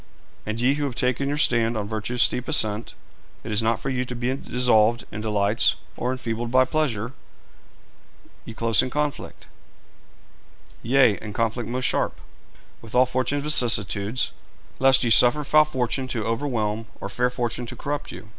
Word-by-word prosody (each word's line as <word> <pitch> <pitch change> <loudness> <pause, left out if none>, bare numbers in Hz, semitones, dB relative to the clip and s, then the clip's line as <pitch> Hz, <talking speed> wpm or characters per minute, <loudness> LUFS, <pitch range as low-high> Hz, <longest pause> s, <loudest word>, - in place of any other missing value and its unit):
And 110 +1 -3
ye 125 +3 +3
who 145 0 -2
have 130 -4 -4
taken 125 +3 0
your 145 - -1
stand 115 -5 +1
on 105 -1 -3
virtue's 110 +3 0
steep 125 - 0
ascent, 110 -8 +1 0.5
it 115 - -6
is 105 +1 +2
not 115 0 0
for 135 - -3
you 125 -1 -1
to 125 - -7
be 125 +2 -1
dissolved 120 -3 +2
in 105 - -6
delights 105 0 +2 0.2
or 125 - -2
enfeebled 120 -2 -4
by 130 +1 +4
pleasure; 130 -6 -2 1.3
ye 115 - -10
close 115 -3 +2
in 130 - -3
conflict 150 +1 -4 1.4
yea, 120 -3 +3
in 105 -1 -7
conflict 115 +1 -2
most 125 +1 -2
sharp - - 0 0.6
with 115 0 -9
all 125 +1 +6
fortune's 130 +3 -1
vicissitudes, 115 -5 +2 0.5
lest 135 0 +4
ye 115 - 0
suffer 125 +6 +5
foul 155 +2 +4
fortune 130 -2 -2
to 115 -5 -3
overwhelm 115 -3 -2
or - - -5
fair 125 +5 0
fortune 120 -1 -3
to 125 - -7
corrupt 145 +4 -4
you. 110 - -11
120 Hz, 165 wpm, -24 LUFS, 110-130 Hz, 1.4 s, all